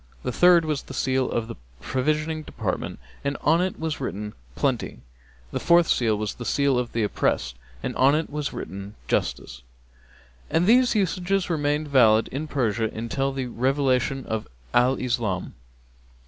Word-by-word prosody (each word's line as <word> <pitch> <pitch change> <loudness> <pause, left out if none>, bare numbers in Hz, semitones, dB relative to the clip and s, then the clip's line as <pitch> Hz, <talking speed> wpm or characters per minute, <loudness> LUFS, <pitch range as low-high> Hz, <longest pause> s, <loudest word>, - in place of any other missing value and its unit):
The 125 - -1
third 175 +4 +5
was 150 -3 -1
the 135 - -10
seal 130 0 +1
of 115 -1 -2
the - - -6 0.3
provisioning 155 - -1
department 110 -10 -4 0.3
and 140 0 -1
on 160 +3 +3
it 185 0 -2
was 160 -1 -2
written, 105 -4 -4 0.2
Plenty. - - -1 0.5
The - - -2
fourth 170 -5 +4
was 110 -3 0
the 120 - -8
seal 135 +2 +2
of 120 -1 -3
the 115 - +1
oppressed, 65 -10 0 0.3
and - - -3
on 135 +3 +5
it 160 +1 0
was 150 -1 -3
written, 100 +2 -7
Justice. - - -2 0.9
And 165 +2 +2
these 245 +3 +5
usages 190 -1 0
remained 150 -1 0
valid 115 -6 +5
in 145 +4 -4
Persia 115 -6 0
until 135 +5 -2
the 135 -1 -3
revelation 130 +1 0
of 110 -1 -3 0.3
Al 125 +2 +4
Islam. 115 -8 -2
135 Hz, 155 wpm, -25 LUFS, 115-155 Hz, 0.9 s, third